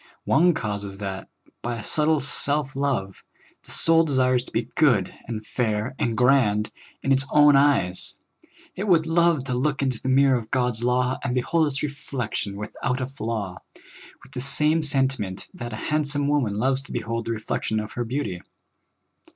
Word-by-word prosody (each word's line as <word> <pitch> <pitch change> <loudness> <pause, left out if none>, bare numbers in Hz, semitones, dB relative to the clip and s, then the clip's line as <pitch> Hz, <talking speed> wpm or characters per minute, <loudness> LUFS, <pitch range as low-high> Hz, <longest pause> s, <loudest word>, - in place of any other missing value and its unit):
One 170 +3 +4
cause 105 -7 -3
is 100 -1 -7
that, 95 -1 -6 0.3
by 120 0 -3
a 105 - -7
subtile 155 +2 +2
self 140 0 +2
love, 130 -9 -2 0.4
the - - -17
soul 165 0 +3
desires 130 -4 +2
to - - -11
be 115 +1 -2
good 130 -10 +2
and 110 -2 -5
iair 110 +1 -1
and 120 -6 -1
grand 125 -5 +3 0.3
in 135 - 0
its 135 0 +4
own 150 -1 +6
eyes; 135 -11 +2 0.6
it 200 +3 -4
would 165 -4 +4
love 165 -3 +2
to 130 - -4
look 135 +3 0
into 130 -4 -1
the 130 - -3
mirror 135 -1 +4
of 110 -1 -11
God's 125 -3 0
law, 125 +1 +1
and 125 - -1
behold 155 +6 +1
its 135 0 -3
reflection 125 -8 -4
without 115 +4 -3
a 130 - -1
flaw, 110 -8 -5 0.6
with - - -17
the 125 - -5
same 150 +4 +2
sentiment 130 -10 0
that 120 0 -7
a - - -5
hand 150 +7 -1
46 140 - +2
SOUL - - -2
FOOD. - - 0
some - - 0
woman 135 -9 0
loves 130 +4 +1
to 140 - -13
behold 115 0 -3
the 115 - -2
reflection 110 0 -2
of 105 0 -6
her 120 - -3
beauty. 115 -7 -3
130 Hz, 190 wpm, -24 LUFS, 110-145 Hz, 0.6 s, own